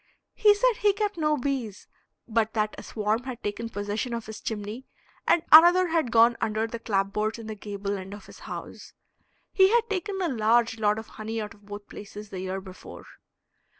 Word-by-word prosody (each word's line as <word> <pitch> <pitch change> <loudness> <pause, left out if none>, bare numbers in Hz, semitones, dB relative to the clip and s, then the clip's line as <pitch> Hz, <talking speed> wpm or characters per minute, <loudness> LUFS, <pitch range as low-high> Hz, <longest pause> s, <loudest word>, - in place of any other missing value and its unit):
He 420 -1 +5
said 485 +1 +2
he 415 -3 +4
kept 415 0 -2
no 305 -2 +1
bees, 250 -6 -3 0.4
but 225 -1 0
that 215 -1 0
a - - -9
swarm 215 +1 -1
had 255 -2 -7
taken 215 +3 -3
possession 210 +3 -3
of 230 - -5
his 220 0 -9
chimney, 215 +3 -5 0.4
and 335 - +4
another 345 +3 +8
had 320 -6 +1
gone 230 +1 +5
under 215 +1 0
the 230 +1 -6
clapboards 210 +1 -1
in 230 - -9
the 220 - -5
gable 200 -1 -4
end 190 +2 -8
of 205 - -13
his - - -14
house. - - -9 0.6
He 380 -1 +6
had 465 +1 +3
taken 390 0 -2
a 365 - 0
large 230 -2 +2
lot 210 -1 +2
of 220 - -6
honey 220 +1 -6
out 210 -1 -5
of 205 -1 -22
both 205 0 -8
places 210 0 -10
the 190 - -5
year 190 +1 -3
before. 185 -1 -11
225 Hz, 195 wpm, -26 LUFS, 210-300 Hz, 0.6 s, another